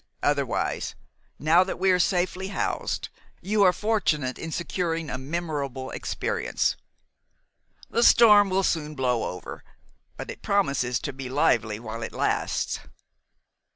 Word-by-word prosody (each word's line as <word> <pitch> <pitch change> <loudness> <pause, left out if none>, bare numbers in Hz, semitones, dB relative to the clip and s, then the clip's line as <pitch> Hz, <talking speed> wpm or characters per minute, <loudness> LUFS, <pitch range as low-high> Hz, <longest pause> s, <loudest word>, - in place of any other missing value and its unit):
Otherwise, - - 0 0.4
now 165 +4 +4
that 185 - -5
we 190 +1 +3
are 180 - +3
safely 180 +1 0
housed, 205 - -2 0.3
you 205 +3 0
are 185 -2 +7
fortunate 175 - 0
in 165 - -5
securing 165 -2 -2
a 130 - -3
memorable 140 -3 -4
experience. - - -1 1.1
The 235 - 0
storm 210 -4 +7
will 190 +1 +1
soon 155 -4 -1
blow 125 -4 0
over; 90 - -9 0.5
but - - -6
it - - -11
promises 140 -11 +1
to 145 - -4
be 130 -1 -7
lively 115 -6 +1
while 115 0 -6
it - - -5
lasts." - - -1
165 Hz, 130 wpm, -26 LUFS, 130-190 Hz, 1.1 s, are